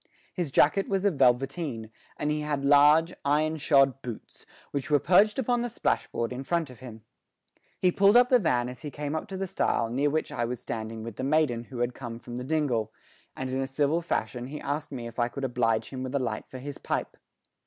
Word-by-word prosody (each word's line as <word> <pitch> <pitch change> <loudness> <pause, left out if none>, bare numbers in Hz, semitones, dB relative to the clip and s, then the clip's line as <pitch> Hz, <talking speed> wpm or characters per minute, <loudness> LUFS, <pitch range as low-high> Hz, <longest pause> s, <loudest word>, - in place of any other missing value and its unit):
His 175 -5 -2
jacket 155 +8 +3
was 195 0 0
of 200 - +3
velveteen, 130 -2 +1 0.3
and 150 - -1
he 150 0 -1
had 145 -2 -2
large, 150 +4 +6
iron 155 +2 +1
shod 135 -3 +3
boots, 120 -4 -9 0.2
which 140 0 -3
were 150 - +5
perched 195 +8 +4
upon 245 -2 +1
the 240 - -2
splashboard 115 - -1
in 130 +2 -5
front 165 -2 -1
of 125 - -14
him. 110 -4 -10 0.7
He 180 - +3
pulled 200 +5 +5
up 245 0 +5
the 250 - +6
van 125 - +1
as 125 0 -8
he 150 - -5
came 145 +1 -4
up 160 - -3
to 190 - -6
the 195 - -2
stile 145 -10 0
near 140 +4 +1
which 155 +2 -1
I 120 - -2
was 120 0 -3
standing 110 -1 -5
with 115 -2 -7
the - - -4
maiden 135 -5 +1
who 125 - -9
had 120 +1 0
come 120 -3 -7
from 120 0 -8
the 125 - -4
dingle, 135 -6 0 0.4
and 130 -1 -4
in 130 +1 -1
a 135 - -2
civil 145 +4 +1
fashion 120 -6 -2
he 150 +2 -6
asked 150 +2 -3
me 125 -4 -5
if 115 +1 -8
I 120 - +3
could 140 +3 -7
oblige 115 -3 0
him 130 -1 -5
with 130 +1 -4
a - - +2
light 125 - -3
for 130 - -8
his 140 +2 -7
pipe. - - -3
140 Hz, 230 wpm, -27 LUFS, 125-155 Hz, 0.7 s, large